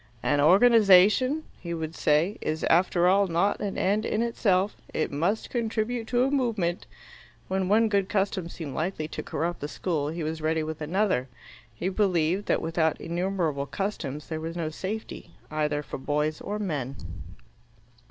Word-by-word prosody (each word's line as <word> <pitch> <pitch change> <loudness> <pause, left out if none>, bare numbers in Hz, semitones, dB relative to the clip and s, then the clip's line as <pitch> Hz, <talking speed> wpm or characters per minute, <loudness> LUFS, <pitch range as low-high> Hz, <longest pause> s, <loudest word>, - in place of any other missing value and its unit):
"An 145 -1 +2
organization," 210 - +5 0.2
he 170 -1 -4
would 160 -1 -4
say, 165 +7 +1
"is 155 +1 -2
after 175 +1 +3
all 195 +2 +4
not 175 +4 +1
an 200 -2 -3
end 205 +3 +1
in 225 0 0
itself. 205 -4 +1 0.2
It 155 - -1
must 175 +10 -1
contribute 230 0 -1
to 245 +1 +2
a 270 - +1
movement." 220 -11 0 0.6
When 190 0 -1
one 225 +2 +4
good 200 -2 +1
custom 195 -4 -1
seemed 155 -5 -7
likely 155 0 -2
to - - -5
corrupt 170 +3 -3
the 145 - -4
school, 150 -2 -2
he 165 +1 -4
was 160 +1 -3
ready 160 0 0
with 155 0 -5
another; 165 -5 0 0.4
he 115 +11 -4
believed 185 -2 +1
that - - +1
without 160 -1 0
innumerable 170 -5 -1
customs 150 -3 -4
there 160 -1 -4
was 165 +2 -5
no 165 -2 -2
safety, 190 - -6 0.2
either 150 -1 -1
for 130 - -7
boys 150 +2 -1
or 210 - -3
men. 145 -10 -3
175 Hz, 160 wpm, -27 LUFS, 155-205 Hz, 0.6 s, organization